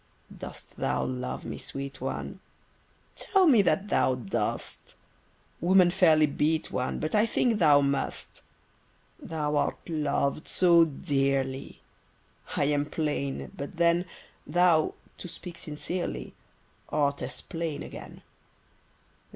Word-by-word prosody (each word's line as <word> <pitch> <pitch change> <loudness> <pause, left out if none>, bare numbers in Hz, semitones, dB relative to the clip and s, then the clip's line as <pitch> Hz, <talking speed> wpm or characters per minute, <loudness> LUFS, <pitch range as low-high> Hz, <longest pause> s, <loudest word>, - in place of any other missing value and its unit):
Dost - - -9
thou - - 0
love 125 0 -4
me, - - -5
sweet 140 0 -6
one? - - -4 0.8
Tell 385 -2 +2
me 255 -10 +6
that 200 +1 +1
thou 130 - +3
dost! 115 -6 -3 0.6
Women 180 +1 +5
fairly 160 -4 +5
beat 155 +2 0
one, 125 0 -2
But 155 - -3
I 215 +2 +4
think 225 -1 +1
thou 145 -4 +6
must. 140 0 -2 0.8
Thou 150 -2 -2
art 145 - -1
loved 150 -2 -1
so 170 -2 +5
dearly: 135 -3 -1 0.8
I - - +3
am 145 0 +1
plain, 145 -3 -2
but 140 +5 -7
then 170 +1 +3 0.4
Thou 175 -3 +3 0.2
(to - - -6
speak 175 0 -8
sincerely) 150 - -4 0.6
Art 145 -1 +1
as - - -5
plain 165 -4 -4
again. - - -10
155 Hz, 120 wpm, -28 LUFS, 140-175 Hz, 0.8 s, me